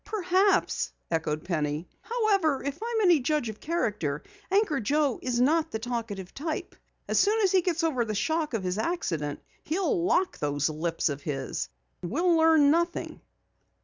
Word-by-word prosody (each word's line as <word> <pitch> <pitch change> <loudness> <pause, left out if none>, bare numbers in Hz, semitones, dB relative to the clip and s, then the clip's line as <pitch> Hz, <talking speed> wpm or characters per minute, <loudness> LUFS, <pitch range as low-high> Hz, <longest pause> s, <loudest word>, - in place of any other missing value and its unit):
"Perhaps," 385 -1 +1 0.2
echoed 155 -2 -1
Penny. 155 -2 -2
"However, 400 - +1
if 280 +1 -4
I 460 - -3
am 445 - +2
any 345 -4 +6
judge 275 -2 0
of 215 - -8
character, 210 - -2 0.3
Anchor 385 -7 +2
Joe 280 +3 +1
isn't 265 +7 +2
the 220 - -3
talkative 220 -5 -5
type. 315 +4 -4 0.3
As - - +2
soon 425 +2 +3
as 380 - +3
he 375 - +4
gets 345 -1 -1
over 280 -7 +1
the 215 -2 -3
shock 315 +3 0
of 210 - -2
this 180 +2 -2
accident, 165 - -2 0.2
he'll 365 +3 0
lock 370 +1 +1
those 145 0 0
lips 165 +2 -1
of 145 -1 -4
his. 135 -3 -3 0.3
We'll 335 - +1
learn 320 -3 +5
nothing." 340 +2 -1
290 Hz, 160 wpm, -27 LUFS, -, 0.3 s, any